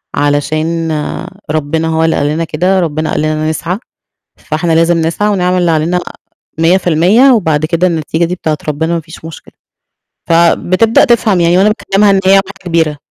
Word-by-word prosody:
علشان 155 +3 -1 0.6
ربنا 155 +1 -1
هو 160 0 0
اللي 160 - +1
قال 145 - 0
لنا 155 +3 -1
كده، 180 +4 0
ربنا 155 -2 -2
قال - - -1
لنا 155 0 -1
نسعى، 170 +4 -3 0.6
فإحنا 165 +1 -2
لازم 165 +1 +2
نسعى 170 +6 -1
ونعمل 185 -2 0
اللي 175 -2 +1
علينا 165 +3 0 0.6
100% 180 - +3
وبعد 160 -9 +1
كده 170 +2 0
النتيجة 165 0 -1
دي 180 +2 -3
بتاعة 155 -3 -2
ربنا 160 +3 -2
ما 170 - 0
فيش 160 +1 -13
مشكلة. 165 -2 -11 0.8
فبتبدأ 180 - +3
تفهم 225 -7 +2
يعني 170 +1 +3
وأنا 195 +3 +4
باكلمها 210 -1 +1
إن 195 -1 +3
هي 190 - +3
واحدة 195 0 +2
كبيرة. 165 -3 0
165 Hz, 165 wpm, -12 LUFS, 155-185 Hz, 0.8 s, وأنا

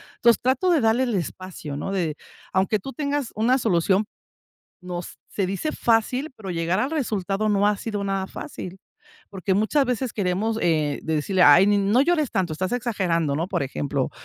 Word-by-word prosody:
entonces, 235 -1 +3
trato 260 +8 +1
de 315 -6 +3
darle 225 +3 +3
el 240 -5 -1
espacio, 170 -4 -5
¿no?, 195 - -4
de 165 -6 -1 0.4
aunque 190 +3 +2
tú 270 - -7
tengas 285 -4 -2
una 240 +5 +3
solución, 190 -2 +2 0.8
nos 180 -1 -6
se 195 -3 -1
dice 195 +12 -2
fácil, 250 +6 +1
pero 195 -3 -7
llegar 170 +2 0
al 260 +6 0
resultado 215 - -1
no 205 0 +3
ha 210 - +3
sido 205 -3 -3
nada 195 -1 -1
fácil, 185 -1 -8 0.5
porque 190 0 -1
muchas 220 +8 +2
veces 250 -1 -1
queremos, 205 +3 -1
eh, 155 -4 +1
de 160 - -1
decirle: 180 +5 +1
"Ay, 175 +7 +8
ni 205 0 +3
no 200 +5 +3
llores 310 -3 +1
tanto, 180 -4 -1
estás 185 +4 -2
exagerando", 185 - 0
¿no?, 170 +4 -2
por 175 -7 -1
ejemplo, 135 0 -2
200 Hz, 180 wpm, -24 LUFS, 180-235 Hz, 0.8 s, Ay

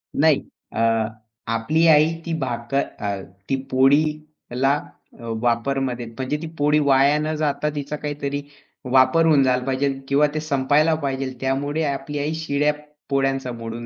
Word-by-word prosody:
नाही. - - +4 0.3
अ, - - -3 0.7
आपली 155 +9 +1
आई 155 +1 +5
ती 170 - -2
भाकर 120 0 -2 0.2
अ, 100 -2 -3 0.3
ती 135 - +2 0.2
पोळीला 145 0 +1 0.6
वापरमध्ये 120 +1 0
म्हणजे 130 +5 -3
ती 165 - -5
पोळी 150 +1 +3
वाया 140 0 +4
न 155 +1 -1
जाता 150 0 0
तिचा 145 +1 -4
काहीतरी 145 -1 -4 0.5
वापर 130 +5 +5
होऊन 150 -4 +5
झाला 125 -1 +2
पाहिजे 135 0 -1
किंवा 140 +2 +3
ते 155 - -1
संपायला 150 +1 +2
पाहिजे 135 -2 -3
त्यामुळे 140 +4 -1
आपली 140 +2 -4
आई 150 +2 -1
शिळ्या 150 -2 0 0.4
पोळ्यांचा 135 -2 0
मोडून 115 0 -6
140 Hz, 140 wpm, -22 LUFS, 130-150 Hz, 0.7 s, आई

